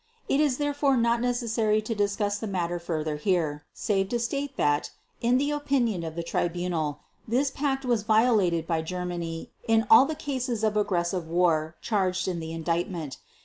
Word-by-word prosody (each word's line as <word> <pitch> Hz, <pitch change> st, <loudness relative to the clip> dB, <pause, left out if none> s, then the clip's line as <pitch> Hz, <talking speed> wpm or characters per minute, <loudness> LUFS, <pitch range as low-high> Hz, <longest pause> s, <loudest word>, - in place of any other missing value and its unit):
It 275 Hz, -, +2 dB
is 290 Hz, -4 st, +2 dB
therefore 290 Hz, -2 st, +1 dB
not 235 Hz, 0 st, +2 dB
necessary 230 Hz, -3 st, +1 dB
to 225 Hz, -, -2 dB
discuss 205 Hz, 0 st, 0 dB
the 220 Hz, -, -4 dB
matter 175 Hz, -3 st, -2 dB
further 155 Hz, -3 st, -2 dB
here, 155 Hz, -4 st, 0 dB
save 195 Hz, -2 st, -1 dB
to 240 Hz, -, 0 dB
state 275 Hz, +4 st, -3 dB
that 145 Hz, 0 st, +1 dB, 0.3 s
in 240 Hz, +2 st, +3 dB
the 285 Hz, +2 st, +1 dB
opinion 270 Hz, -10 st, 0 dB
of 160 Hz, -1 st, -5 dB
the 170 Hz, -, -3 dB
Tribunal 170 Hz, -3 st, -2 dB, 0.3 s
this 260 Hz, +5 st, +1 dB
Pact 270 Hz, -2 st, -1 dB
was 240 Hz, -4 st, +2 dB
violated 215 Hz, -6 st, +3 dB
by 165 Hz, -1 st, 0 dB
Germany 175 Hz, -1 st, -4 dB, 0.2 s
in 225 Hz, 0 st, +3 dB
all 225 Hz, +4 st, +9 dB
the 315 Hz, -, -3 dB
cases 255 Hz, -6 st, -3 dB
of 215 Hz, -1 st, +2 dB
aggressive 180 Hz, -4 st, 0 dB
war 165 Hz, -2 st, +1 dB
charged 190 Hz, -4 st, 0 dB
in 180 Hz, -2 st, -2 dB
the 160 Hz, 0 st, -5 dB
Indictment. 165 Hz, -2 st, -2 dB
205 Hz, 170 wpm, -27 LUFS, 170-240 Hz, 0.3 s, all